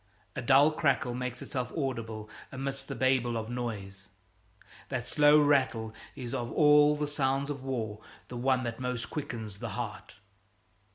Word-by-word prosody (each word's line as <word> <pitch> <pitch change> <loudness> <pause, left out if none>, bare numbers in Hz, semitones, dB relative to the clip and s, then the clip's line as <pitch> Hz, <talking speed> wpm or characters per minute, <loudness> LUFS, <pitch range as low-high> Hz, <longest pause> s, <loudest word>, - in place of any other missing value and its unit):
A - - -2
dull 140 +4 +6
crackle 140 -5 +1
makes 125 0 -4
itself 125 -2 -3
audible 115 -6 -3 0.2
amidst 135 +1 -4
the - - -5
babel 130 -3 +2
of 110 +1 -4
noise. 100 -6 -5 0.8
That - - -3
slow 150 0 +6
rattle 130 -7 +2 0.2
is 125 -3 -6
of 120 -1 -3
all 150 0 +6
the 150 0 -1
sounds 140 0 0
of 140 -2 -6
war 110 -5 -3 0.3
the 125 - -8
one 130 +1 +1
that 115 0 -4
most 125 -2 -3
quickens 115 -9 -5
the - - -4
heart. - - -6
130 Hz, 155 wpm, -30 LUFS, 115-140 Hz, 0.8 s, dull